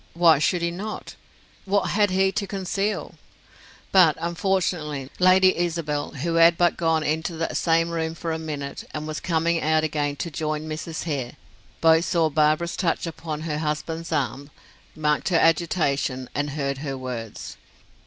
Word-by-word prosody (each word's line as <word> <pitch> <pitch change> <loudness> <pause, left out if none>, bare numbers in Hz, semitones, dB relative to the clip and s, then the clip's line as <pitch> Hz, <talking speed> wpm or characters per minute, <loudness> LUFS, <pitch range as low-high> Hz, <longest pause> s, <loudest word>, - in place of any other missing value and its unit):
Why 170 -3 +5
should 170 +3 +1
he 170 - 0
not? 205 +5 -6 0.5
What 200 0 +1
had 205 -1 +3
he 190 +1 +2
to 200 +1 -2
conceal? 195 +1 -3 0.7
But, 180 -5 +6
unfortunately, 170 -5 -1
Lady 185 +1 +5
Isabel, 165 -4 -2
who 165 +5 -2
had 170 0 +6
but 175 -1 +3
gone 165 -2 +1
into 160 +3 -1
that 165 - -2
same 165 0 +2
room 165 -1 -2
for 165 0 -4
a 160 - -2
minute, 145 -3 -5
and 150 0 -4
was 155 0 -4
coming 165 0 0
out 155 0 +2
again 145 -2 -1
to 170 +3 -5
join 155 0 -3
Mrs. 160 +1 -5
Hare, 140 -7 -3 0.5
both 160 +1 +5
saw 165 -3 +1
Barbara's 155 +3 +2
touch 175 -2 0
upon 160 -2 -5
her 155 -2 -3
husband's 160 +2 -3
arm, 140 -1 -2 0.5
marked 150 +2 0
her 175 - +3
agitation, 155 -6 +1
and 145 0 -1
heard 140 -2 -2
her 135 -2 -4
words. 120 -4 -6
160 Hz, 160 wpm, -24 LUFS, 150-170 Hz, 0.7 s, But